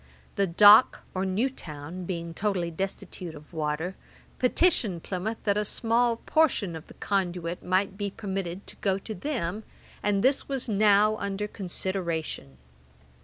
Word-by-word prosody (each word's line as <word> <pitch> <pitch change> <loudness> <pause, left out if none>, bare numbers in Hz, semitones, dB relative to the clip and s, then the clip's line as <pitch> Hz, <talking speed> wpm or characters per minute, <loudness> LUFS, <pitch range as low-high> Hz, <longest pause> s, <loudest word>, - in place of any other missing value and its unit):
The 200 -1 +2
Dock, 205 +7 +7
or 190 +1 -1
New 200 +7 +1
town, 165 - -7
being 170 -2 -4
totally 185 -2 -1
destitute 185 -1 -5
of 150 +3 -14
water, 160 +3 -2 0.4
petitioned 250 - +2
Plymouth 200 +4 -3
that 200 -1 +2
a - - +1
small 230 +2 +1
portion 235 - +1
of 160 - -9
the - - -14
conduit 175 -3 -2
might 190 +2 0
be 205 0 -1
permitted 195 -3 -5
to - - -5
go 195 -2 0
to 215 +3 -7
them, 220 - -3 0.4
and 200 -1 +1
this 270 +2 +2
was 270 -2 -1
now 210 0 +4
under 200 0 -3
consideration. 175 - -3
195 Hz, 145 wpm, -27 LUFS, 175-215 Hz, 0.4 s, Dock